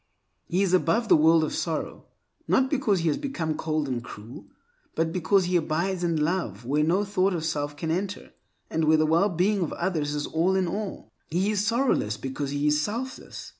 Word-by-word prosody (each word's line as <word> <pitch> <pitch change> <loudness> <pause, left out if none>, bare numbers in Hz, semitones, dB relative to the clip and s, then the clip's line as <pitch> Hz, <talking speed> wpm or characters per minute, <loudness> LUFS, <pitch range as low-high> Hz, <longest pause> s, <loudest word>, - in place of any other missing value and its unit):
He 185 +3 +1
is 185 -2 0
above 225 +5 +2
the - - +8
world 160 +1 +5
of 155 - -2
sorrow, 160 -2 -3 0.4
not 260 0 +2
because 220 - +1
he 165 - 0
has 150 - -1
become 170 - -2
cold 155 -1 -1
and 125 -3 -3
cruel, 110 +2 -10 0.5
but 160 0 0
because 185 +2 +2
he 180 +1 -1
abides 175 +3 0
in 170 -2 +1
a - - 0
love 150 - -2
where 145 +4 +1
no 180 +6 +2
thought 195 -1 +1
of 160 -1 -3
self 145 -2 -2
can 160 0 -2
enter, 195 +4 -3 0.4
and 160 0 0
where 155 +1 +5
the 155 - +3
well 165 +6 +3
being 190 +3 +1
of 165 - -2
others 155 -5 -1
is 150 - -2
all 170 +4 +1
in 190 -2 +1
all. 200 +3 -5 0.2
He 185 +6 0
is 205 -1 0
sorrowless 230 - +1
because 135 +1 -4
he 145 +1 -2
is 150 0 +3
selfless. 240 - -5
170 Hz, 205 wpm, -26 LUFS, 155-195 Hz, 0.5 s, the